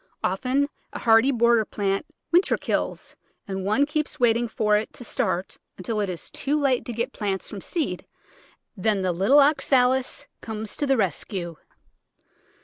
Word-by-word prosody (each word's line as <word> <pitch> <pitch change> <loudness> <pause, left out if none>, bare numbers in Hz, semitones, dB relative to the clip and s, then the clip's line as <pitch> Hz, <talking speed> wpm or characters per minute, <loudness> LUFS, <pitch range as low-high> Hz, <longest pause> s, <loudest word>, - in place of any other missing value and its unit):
Often 255 +9 +1 0.3
a - - -4
hardy 225 +3 +5
border 235 -2 +4
plant 195 -1 -2 0.2
winter 350 +3 +4
kills - - -3 0.3
and 190 -1 -4
one 215 +9 +2
keeps 300 0 -3
waiting 240 0 +3
for 210 -1 +1
it 210 +1 -1
to - - -10
start 185 -4 -2 0.2
until 210 +4 -3
it 205 -2 -1
is 175 -4 -6
too 290 +3 0
late 270 -4 +1
to - - -4
get 235 +1 -2
plants 195 -3 -2
from 200 -3 -7
seed, 270 - -3 0.7
then 200 -1 0
the 185 - +1
little 195 +12 +4
Oxalis 265 -3 +2
comes 220 -1 -5
to 290 - 0
the 270 -1 +3
rescue. 180 -5 -2
225 Hz, 155 wpm, -24 LUFS, 195-265 Hz, 0.7 s, hardy